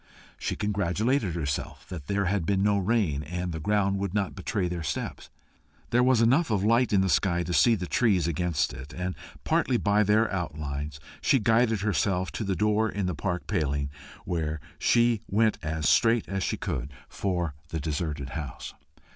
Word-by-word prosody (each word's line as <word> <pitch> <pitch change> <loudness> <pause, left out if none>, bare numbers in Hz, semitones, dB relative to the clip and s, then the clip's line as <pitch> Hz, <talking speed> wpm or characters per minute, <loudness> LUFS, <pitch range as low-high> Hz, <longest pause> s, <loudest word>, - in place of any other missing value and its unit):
She - - -2
congratulated 105 - 0
herself 70 -5 -3
that 80 -6 -7
there 100 0 0
had 95 0 0
been 95 +2 +1
no 100 -1 +3
rain, 95 -8 +1
and 90 +3 -4
the 80 - -4
ground 100 +2 +1
would 100 -1 -3
not 100 -2 0
betray 95 0 -2
their 85 -1 -3
steps. 75 - -4 0.6
There 120 - +4
was 125 -2 +4
enough 135 +8 +3
of 100 -3 +1
light 115 +3 +3
in 100 -2 +4
the 95 - +2
sky 85 +1 +2
to 90 - -3
see 115 +6 +5
the 90 -4 -4
trees 95 -5 +2
against 85 -5 0
it, 65 +4 -9
and 90 +1 -3 0.3
partly 125 -1 +2
by 105 -1 +2
their 105 +2 +3
outlines 75 -4 -4 0.2
she 135 - +4
guided 115 -1 +2
herself 95 -3 0
to - - -4
the 95 -2 -1
door 105 +4 +2
in 100 -2 -2
the 90 - -1
park 90 +3 -3
paling, 70 -7 -1 0.3
whence 80 -2 -2 0.2
she 120 -2 +3
went 110 +2 +2
as 80 0 -1
straight 115 -1 +4
as 95 0 -2
she - - -1
could 70 - -3 0.2
for 90 -5 -2 0.2
the 80 - -3
deserted 75 -2 -3
house. 70 -2 -6
95 Hz, 180 wpm, -27 LUFS, 80-105 Hz, 0.6 s, see